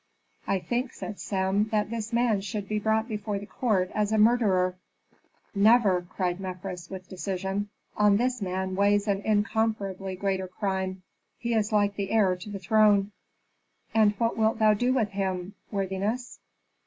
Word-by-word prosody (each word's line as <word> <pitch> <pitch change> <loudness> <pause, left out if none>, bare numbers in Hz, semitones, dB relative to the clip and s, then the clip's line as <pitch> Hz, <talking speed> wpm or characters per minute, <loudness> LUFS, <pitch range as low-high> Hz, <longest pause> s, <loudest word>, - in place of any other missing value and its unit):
"I 195 - +2
think," 240 +8 -2
said 210 - -7
Sem, 195 +1 0
"that 215 -1 -1
this 230 0 -4
man 235 -4 +2
should 200 0 -4
be 215 +1 -1
brought 220 +1 +1
before 210 -2 -3
the 200 - -6
court 200 -5 0
as 210 0 0
a 220 - +2
murderer." 210 -5 +3 0.8
"Never!" 205 -3 +4
cried 180 0 -3
Mefres, 180 -2 -6
with 185 -1 -8
decision. 195 +2 -3 0.3
"On 210 -1 +4
this 250 +1 0
man 190 0 -2
weighs 205 +1 +2
an 200 -1 +1
incomparably 205 -3 0
greater 190 0 -1
crime, 190 -1 -3 0.3
he 235 -1 -2
is 220 -1 +1
like 205 -1 +2
the 200 -1 -2
heir 205 -5 +3
to 180 +3 -10
the 205 - -5
throne." 205 +1 +3 0.8
"And 215 -2 +4
what 230 +3 0
wilt 220 0 +2
thou 215 -1 +5
do 245 +5 +1
with 240 -5 +1
him, 190 -1 -3 0.2
worthiness?" 200 +5 -3
205 Hz, 160 wpm, -27 LUFS, 190-220 Hz, 0.8 s, thou